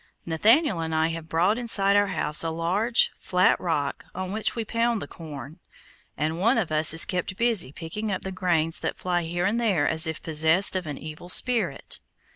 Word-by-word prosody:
Nathaniel 215 - +3
and 160 -1 -3
I 160 +1 +1
have 165 -1 -7
brought 185 +8 +1
inside 200 -4 +4
our 205 0 +3
house 160 -4 0
a 165 - -1
large, 185 +9 +1
flat 180 0 +2
rock, 150 -5 -2
on 185 0 -4
which 215 +1 0
we 230 -2 -3
pound 230 +1 0
the - - -6
corn, 150 0 -10 0.6
and 155 +3 -2
one 230 +7 +3
of 195 -8 -1
us 155 0 +4
is 165 - +4
kept 180 0 -3
busy 230 - +1
picking 190 +8 -5
up 190 - -3
the 190 - -5
grains 170 -3 0
that - - -4
fly 180 -1 -1
here 175 +1 -3
and 225 +5 0
there 190 -11 +1
as 160 +1 0
if 160 -1 -4
possessed 160 +5 +3
of 185 -3 -3
an 145 -2 -5
evil 155 +3 -9
spirit. 210 - -1
175 Hz, 200 wpm, -25 LUFS, 160-205 Hz, 0.6 s, inside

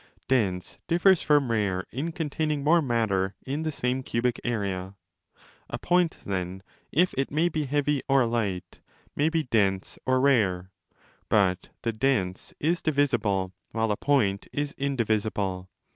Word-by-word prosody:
Dense 95 -9 0
differs 175 +1 +4
from 145 -5 +3
rare 100 -4 0
in 145 +7 -3
containing 155 -3 -2
more 165 +3 +5
matter 110 -7 0
in 140 +4 -2
the 160 0 -1
same 130 -2 -1
cubic 120 -1 -1
area. 100 -5 -2 0.7
A - - -3
point, 175 -2 +2
then, 95 -1 -3 0.3
if 175 +5 +3
it 135 - 0
may 160 +4 +2
be 155 -2 -2
heavy 145 0 +1
or 135 -2 +5
light, 100 -6 -2 0.3
may 150 +2 +2
be 165 -1 0
dense 100 -6 0
or 130 0 +3
rare. 100 -9 +2 0.6
But 95 -3 +2
the 115 - 0
dense 110 -7 0
is 170 +3 +1
divisible 115 - +1 0.2
while 110 -1 +1
a - - +1
point 105 -7 +1
is 145 0 -2
indivisible. 105 -8 -1
120 Hz, 145 wpm, -27 LUFS, 100-145 Hz, 0.7 s, more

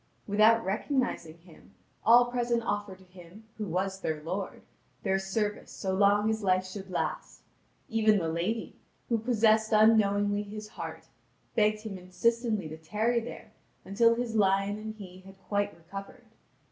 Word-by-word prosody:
Without 215 +2 +4
recognising 200 - -1
him, 170 -2 -19 0.3
all 245 +2 +6
present 240 -1 0
offered 205 -4 -3
to 190 - -18
him, 180 +3 -15 0.2
who 210 - -2
was 190 +2 -2
their 155 -1 -2
lord, 185 +4 -4 0.4
their 190 0 +1
service 205 +2 -2
so 190 -2 -3
long 205 +2 +4
as 220 0 0
life 185 -1 +2
should 190 +1 -8
last; 180 - -4 0.4
even 220 -1 +3
the 165 -4 -1
lady, 180 +8 -2 0.3
who 230 -2 +2
possessed 220 -1 +3
unknowingly 205 -2 +4
his 210 +1 -8
heart, - - -8 0.4
begged 215 -1 +2
him 210 -4 -6
insistently 215 +1 0
to 155 +1 -8
tarry 215 +9 0
there 230 - -9 0.3
until 230 +4 +3
his 235 -1 -3
lion 195 0 +2
and 215 0 -6
he 185 -3 -11
had 195 +1 -15
quite 205 -4 -1
recovered. 195 +4 -10
205 Hz, 150 wpm, -29 LUFS, 190-220 Hz, 0.4 s, all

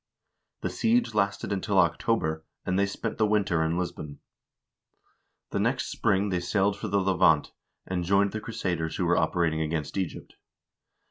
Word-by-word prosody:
The - - -2
siege 235 +1 +1
lasted 100 0 0
until 100 +1 -1
October, 80 -2 +1 0.2
and 95 +1 0
they 100 - +3
spent 100 - -4
the 110 - +4
winter 100 -6 +2
in 80 +2 0
Lisbon. 75 -5 -4 1.3
The - - -1
next 120 +5 0
spring 100 -2 +1
they 90 -2 0
sailed 100 +3 +1
for 110 - -5
the 100 0 +1
Levant, 90 -5 +3 0.3
and 90 -2 -2
joined 100 +2 +3
the 110 - -4
crusaders 90 -8 -3
who - - 0
were - - +3
operating 80 -2 +1
against 75 +2 -2
Egypt. 95 -4 -5
95 Hz, 155 wpm, -27 LUFS, 85-100 Hz, 1.3 s, the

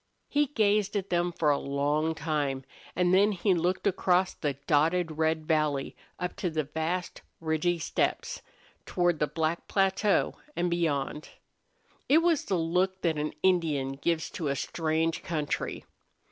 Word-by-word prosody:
He 290 0 +2
gazed 210 -5 +1
at 195 -1 -2
them 175 0 +1
for 155 -3 +2
a 140 - +1
long 145 +3 0
time, 145 -4 -1 0.3
and 180 +1 +2
then 205 +3 +5
he 190 +1 +2
looked 180 +2 0
across 185 -1 +2
the 145 -3 -2
dotted 160 +1 +2
red 160 0 +1
valley 155 -3 0 0.2
up 180 - -4
to 180 - -1
the 155 -1 -1
vast 160 +5 -3 0.2
ridgy 165 +2 0
steppes, 165 - -1 0.5
toward 175 -3 +1
the 150 - +2
black 165 +2 -2
plateau 195 +1 +2 0.2
and 175 0 0
beyond. 150 -3 -1 0.8
It 315 +4 +5
was 335 -4 +2
the 190 - 0
look 180 +3 0
that 160 -3 0
an 150 +1 -2
Indian 160 -8 +2
gives 160 +4 -1
to 165 -6 -3
a 140 - 0
strange 160 +2 -1
country. 155 -3 -3
165 Hz, 150 wpm, -28 LUFS, 155-185 Hz, 0.8 s, then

